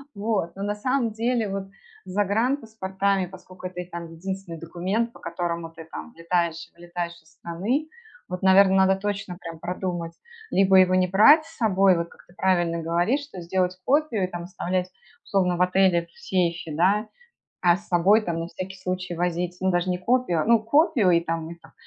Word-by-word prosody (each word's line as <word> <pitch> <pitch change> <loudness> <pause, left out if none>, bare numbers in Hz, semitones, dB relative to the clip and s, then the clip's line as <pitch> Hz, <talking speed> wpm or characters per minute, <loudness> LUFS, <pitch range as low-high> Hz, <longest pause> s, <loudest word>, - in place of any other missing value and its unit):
Вот. 200 -5 -1
Но 195 - -5
на 205 +1 -1
самом 250 +1 0
деле 230 0 0
вот 195 0 -4 0.4
с 185 - -9
загранпаспортами, 200 -2 0
поскольку 185 0 -10
это 180 0 -9
и - - -8
там 170 -2 -7
единственный 185 0 -6
документ, 190 +8 -2
по - - -15
которому 170 -1 -3
ты 165 0 -12
там 80 - -9
влетаешь-вылетаешь 170 0 -3
из 160 - -25
страны, 215 - -2 0.4
вот, 180 +1 -5
наверное, 190 0 +6
надо 190 0 +5
точно 200 -1 -4
прям 165 -1 -8
продумать 175 -1 -4 0.4
либо 190 0 +5
его 185 0 +5
не 185 0 +3
брать 255 - +6
с 325 - -16
собой, 195 -5 +4
вот 170 0 -3
как - - -19
ты 175 - -20
правильно 175 -3 +1
говоришь, 175 - +1
что 240 -11 -9
сделать 180 +1 -1
копию 270 -6 +1
и - - +1
там 175 -1 -6
оставлять 185 0 -2 0.4
условно 180 -3 +1
в 180 - -1
отеле, 180 -2 +3
в 170 - -29
сейфе, 170 -3 -1
да, 200 +7 +2 0.5
а 175 -1 +5
с 210 +2 -17
собой 185 +5 +4
там, 170 -5 -3
на 165 - -4
всякий 185 +2 -7
случай, 185 -1 -4
возить, 175 +1 -2
ну, 190 - +2
даже 175 +1 0
не 180 - 0
копию, 185 -5 +1
ну, 230 -2 +5
копию 285 - +3
и 170 - +4
там, 165 -1 -3
ну, 170 - -8
там 135 -1 -18
185 Hz, 185 wpm, -25 LUFS, 170-200 Hz, 0.5 s, наверное